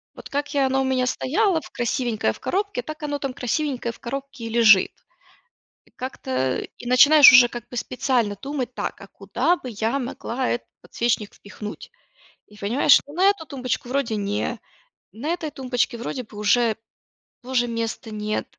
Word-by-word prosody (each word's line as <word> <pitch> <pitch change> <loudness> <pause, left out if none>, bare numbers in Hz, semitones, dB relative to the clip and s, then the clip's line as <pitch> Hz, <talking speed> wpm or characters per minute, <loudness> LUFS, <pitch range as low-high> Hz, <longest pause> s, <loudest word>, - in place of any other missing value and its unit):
Вот - - -10
как 285 +1 -3
я 280 - +3
и - - +3
оно 265 0 +1
у - - +1
меня 260 -1 +1
стояло 350 - +1
в - - -13
красивенькое 240 - -1
в - - -15
коробке, 400 -8 -2
так 310 +3 -8
оно 290 -1 -2
там 275 -2 -3
красивенькое 250 -1 -2
в - - -16
коробке 270 0 -6
и - - -4
лежит. 220 -4 +5 1.0
И - - -25
как-то, 255 - -7
э, 130 0 -1
и - - -9
начинаешь 285 +4 +8
уже 245 -1 +8
как 240 -1 -8
бы 245 - -8
специально 240 -4 0
думать: 270 -3 -4
"Так, - - -4
а - - -10
куда 240 - 0
бы 260 - -9
я 225 +4 -1
могла 250 0 -3
этот 240 - -2 0.2
подсвечник 230 -3 -2
впихнуть?". 210 +1 -9 0.6
И 210 - -18
понимаешь, 235 +8 +3
что 285 - -1
на 360 +4 0
эту 400 -5 -2
тумбочку 255 -2 -3
вроде 255 -4 -1
не, 205 0 -2 0.5
на 245 +8 -6
этой 320 -3 -5
тумбочке 250 -1 -1
вроде 250 +2 -4
бы 215 -3 -13
уже 220 +2 +3 0.7
тоже 245 -1 0
места 230 -1 -4
нет, 215 0 -2
250 Hz, 180 wpm, -23 LUFS, 225-275 Hz, 1.0 s, начинаешь